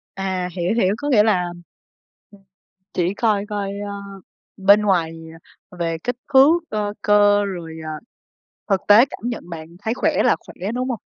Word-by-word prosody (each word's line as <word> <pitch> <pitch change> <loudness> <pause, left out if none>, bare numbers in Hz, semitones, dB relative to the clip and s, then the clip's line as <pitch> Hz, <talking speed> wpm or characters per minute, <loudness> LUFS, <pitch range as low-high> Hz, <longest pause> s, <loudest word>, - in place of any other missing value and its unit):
À, 190 -2 -2
hiểu, 175 +2 -1
hiểu, 200 -4 +2
có 290 +4 -3
nghĩa 220 -7 +5
là 190 -5 +2 1.5
chỉ 180 +2 0
coi 210 -2 0
coi, 205 -2 -3
ơ, 205 0 -5 0.6
bên 200 +2 +5
ngoài, 165 -5 0 0.5
ờ, 180 - -15
về 165 -1 -1
kích 245 0 -2 0.2
thước, 290 +6 +6
ờ, 210 -1 -2
cơ, 205 0 +4
rồi, 170 -5 -6
à, 155 - -5 0.8
thực 195 -1 +3
tế 210 +4 +8
cảm - - -10
nhận 220 -7 -7
bạn 160 -2 -7
thấy 220 +4 -2
khỏe - - +1
là - - +4
khỏe, 195 +4 -6
đúng 255 +1 -2
hông? 235 - -3
205 Hz, 165 wpm, -21 LUFS, 180-215 Hz, 1.5 s, tế